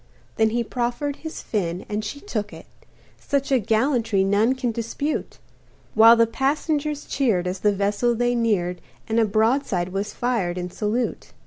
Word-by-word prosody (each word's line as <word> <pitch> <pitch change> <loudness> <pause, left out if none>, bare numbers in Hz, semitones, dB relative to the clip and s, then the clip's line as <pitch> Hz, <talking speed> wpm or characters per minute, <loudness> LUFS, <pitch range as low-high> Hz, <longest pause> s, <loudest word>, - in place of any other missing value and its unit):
Then 220 0 +4
he 235 +2 0
proffered 245 +5 -2
his 320 -1 -7
fin 180 -4 -2
and 210 +1 -3
she 215 +7 -5
took 215 - -4
it - - -11 0.5
Such 280 -1 -1
a 265 - +4
gallantry 225 -2 +1
none 205 +6 +2
can 255 -2 -1
dispute 235 +7 -3 0.6
While 225 +2 +8
the 230 0 +5
passengers 290 +4 -1
cheered 220 -10 +1
as 180 +1 -3
the 210 - +3
vessel 205 +4 +1
they 245 +1 +1
neared 200 -7 0 0.3
And 225 +1 +1
a 225 - +4
broadside 215 -3 +1
was 195 +2 -3
fired 220 -8 -1
in 180 0 -4
salute. 220 +5 -2
225 Hz, 160 wpm, -23 LUFS, 205-255 Hz, 0.6 s, While